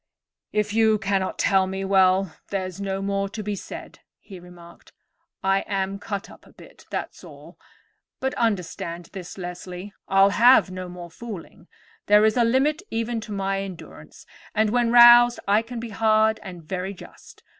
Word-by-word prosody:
"If 210 -1 -1
you 220 -1 +3
cannot 195 -2 -1
tell 190 -1 +2
me, 190 +1 -4
well, 190 -2 +3
there's 190 -1 -4
no 195 0 -3
more 195 0 -1
to 215 +1 -6
be 205 0 -3
said," - - -9 0.2
he 190 -3 -12
remarked. 175 -1 -16 0.5
"I 195 0 +2
am 195 0 -2
cut 200 -2 -5
up - - -16
a - - -18
bit, - - -17
that's - - -6
all. - - -14 0.6
But 265 0 -2
understand 175 -6 -3
this, 185 -2 -8
Leslie, 180 +2 -8
I'll 195 +1 +4
have 235 -1 +5
no 185 -1 -6
more 175 -1 -10
fooling. 200 -5 -10 0.4
There 210 +1 +6
is 220 - +2
a 245 - +3
limit 270 +7 +1
even 230 0 -2
to 220 - -10
my 195 -1 -2
endurance, 190 -3 -11 0.3
and, 215 -1 +2
when 240 -1 +1
roused, 240 0 +8
I 205 +2 +4
can 235 +1 -7
be 235 0 -6
hard 220 +1 +2
and 180 -4 -10
very 190 +4 -4
just. - - -15
200 Hz, 165 wpm, -24 LUFS, 185-220 Hz, 0.6 s, roused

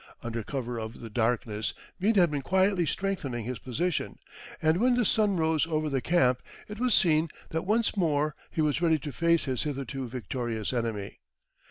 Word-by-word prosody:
Under 115 -1 -3
cover 120 0 -4
of 110 +1 -6
the 115 -2 -8
darkness, 110 -2 0 0.2
Meade 210 +4 +2
had 175 -5 +5
been 145 -2 -1
quietly 190 +2 +2
strengthening 145 - -2
his 125 -2 -4
position, 165 +8 -2 0.4
and 160 0 +3
when 245 +4 +3
the 245 -2 +2
sun 205 -2 +3
rose 160 -1 +2
over 155 -2 -1
the 135 -1 0
camp, 130 -7 +3 0.3
it 210 0 -8
was 250 -1 +3
seen 160 -3 +3 0.2
that 160 +3 -3
once 225 +2 +2
more 155 -5 +1 0.2
he 160 - -1
was 150 +1 +1
ready 165 -2 +4
to 145 0 -6
face 170 +2 +2
his 130 -3 -1
hitherto 135 -2 -3
victorious 120 -1 -3
enemy. 115 -5 -3
150 Hz, 180 wpm, -28 LUFS, 125-175 Hz, 0.4 s, had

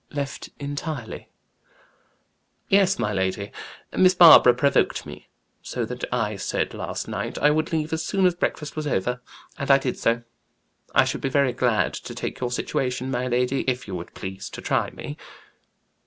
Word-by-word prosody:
"Left 140 0 -5
entirely?" 145 -3 -5 1.4
"Yes, 195 -1 +4
my 105 - -1
lady. 95 +1 -2 0.4
Miss 185 0 +5
Barbara 160 -8 +9
provoked 140 +2 +1
me - - -11 0.3
so, 120 - -3
that 125 +2 -7
I 110 -4 -1
said - - -2
last - - -5
night - - -4
I 150 - +4
would 155 +1 0
leave 160 -1 -1
as 160 0 -1
soon 195 +2 +1
as 180 - +4
breakfast 150 -3 -3
was 155 -1 -3
over. 125 0 -1 0.4
And 140 - -3
I 135 - +8
did 135 -2 -3
so. 115 +1 +1 0.7
I - - +6
should - - -3
be 135 - -1
very 140 -2 +2
glad 120 -4 +1
to - - -7
take - - -5
your 125 - -1
situation, 125 +1 -2
my 125 0 -1
lady, 125 +2 +1
if 130 -1 -1
you 100 - -6
would 85 -1 -7
please 95 0 -6
to - - -8
try - - 0
me." - - -8
130 Hz, 170 wpm, -24 LUFS, 120-150 Hz, 1.4 s, Barbara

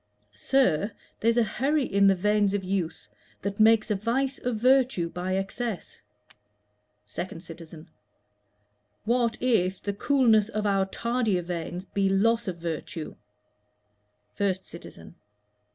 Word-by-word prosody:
Sir, 205 - +1 0.3
there's 230 +1 +2
a 240 - +5
hurry 275 +6 0
in 200 -2 +3
the 195 - +5
veins 205 +1 +2
of 200 - -2
youth 185 -3 -3 0.4
That 200 +1 -3
makes 220 0 +5
a - - +2
vice 260 +7 -1
of 245 -2 -2
virtue 250 -6 +3
by 185 +1 -2
excess. 195 +1 -4 1.1
2D 170 - -6
CITIZEN. 165 -2 -11 1.2
What 235 0 +1
if 195 -7 +1
the 200 - -3
coolness 225 -2 +3
of 215 -2 -3
our 195 -1 +2
tardier 230 -4 -1
veins 175 +1 -5
Be 195 0 0
loss 230 +4 +2
of 180 -2 -3
virtue? 165 -1 -5 1.3
1ST 190 -2 0
CITIZEN. 170 - -11
200 Hz, 125 wpm, -27 LUFS, 185-235 Hz, 1.3 s, a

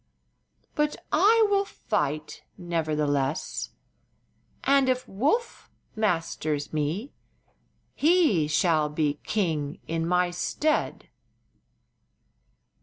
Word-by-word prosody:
But 300 0 0 0.2
I 435 +7 +5
will 400 0 +3
fight, 155 - -3 0.2
nevertheless, 150 -5 -1 0.9
and 275 -1 +4
if 255 0 0
Woof 295 - -1 0.3
masters 165 -8 -1
me 155 - -2 0.8
he 305 - +3
shall 155 -1 +2
be 150 -1 -1
king 160 -9 -1
in 165 0 -1
my 180 0 +2
stead." 300 - -1
175 Hz, 80 wpm, -26 LUFS, -, 0.9 s, I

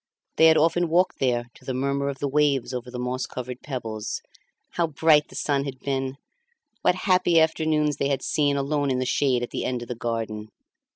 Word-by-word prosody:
They 160 - +7
had 160 0 +6
often 165 +2 +2
walked 180 +3 +2
there 120 -2 +1
to - - -19
the 130 - -3
murmur 140 +1 0
of 140 - -5
the 145 - -2
waves 140 -3 +1
over 125 0 -5
the 125 - -7
moss 125 +1 -2
covered 125 0 -6
pebbles. 115 -6 -5 0.5
How 170 -1 0
bright 150 -1 +3
the - - -14
sun 140 -1 0
had 135 -2 -5
been! 135 0 -2 0.7
What - - +3
happy 180 -3 +4
afternoons 155 -2 +1
they 140 - 0
had 140 - -1
seen 145 -2 +1
alone 140 0 0
in 130 - +1
the 130 - -1
shade 125 -1 +1
at 120 - -5
the - - -3
end 125 -1 -2
of - - -10
the 125 - -3
garden! 115 -2 -4
140 Hz, 210 wpm, -25 LUFS, 125-150 Hz, 0.7 s, They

